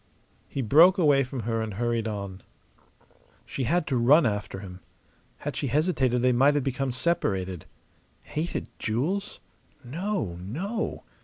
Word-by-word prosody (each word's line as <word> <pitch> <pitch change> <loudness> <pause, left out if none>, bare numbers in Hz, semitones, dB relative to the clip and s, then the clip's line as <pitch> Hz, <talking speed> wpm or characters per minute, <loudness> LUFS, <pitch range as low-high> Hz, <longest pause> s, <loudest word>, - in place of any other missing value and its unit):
He 135 - -3
broke 165 - +6
away 145 -6 +4
from 130 -1 -5
her 115 +1 -1
and 110 -3 -4
hurried 115 0 0
on. 100 -3 -5 1.0
She 130 - -3
had 170 +5 +1
to 135 - 0
run 140 +6 +5
after 105 -3 -2
him. 90 -2 -9 0.6
Had - - -5
she - - -2
hesitated 135 -6 +1
they 125 - +5
might 135 +4 +4
have 145 - +1
become 135 0 -1
separated. 95 - -1 0.6
Hated 160 +3 -3
jewels? 155 - -2 0.4
No, 145 - -3
no! 190 - -3
130 Hz, 140 wpm, -27 LUFS, 110-155 Hz, 1.0 s, broke